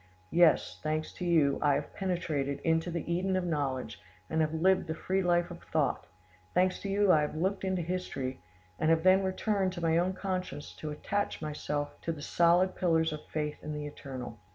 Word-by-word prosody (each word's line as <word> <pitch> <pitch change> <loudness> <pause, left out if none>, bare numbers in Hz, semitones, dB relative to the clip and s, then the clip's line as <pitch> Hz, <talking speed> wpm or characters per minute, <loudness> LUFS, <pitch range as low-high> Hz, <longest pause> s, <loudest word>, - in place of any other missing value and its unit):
Yes, 170 -2 +4
thanks 155 0 -2
to 180 - -5
you, 160 -5 +3
I 145 -2 +4
have 145 +1 -4
penetrated 160 -7 -1
into 165 +1 +1
the 170 -2 -4
Eden 185 +2 0
of 185 -1 0
knowledge, 135 -8 -2 0.3
and 160 - +2
have 155 -1 +1
lived 185 +3 +3
the 160 - -2
free 190 +4 0
life 175 -1 +2
of 175 - -9
thought; - - -1 0.5
thanks 185 0 +3
to 200 - -5
you, 200 -1 +4
I 155 - +5
have 150 - -2
looked 190 +5 -1
into 190 -2 0
history, 160 - -3 0.4
and 155 - +2
have 165 0 +3
then 190 +1 +6
returned 190 0 0
to 175 - -6
my 165 0 +3
own 185 +2 +1
conscience 185 -6 -4
to 155 - -5
attach 200 +7 -2
myself 150 -1 -4
to 165 - -2
the 150 -3 -7
solid 175 +3 +3
pillars 160 -3 +2
of 150 - -7
faith 150 -1 -3
in 150 - -4
the 150 0 -4
Eternal. 130 -5 -7
165 Hz, 200 wpm, -30 LUFS, 150-185 Hz, 0.5 s, then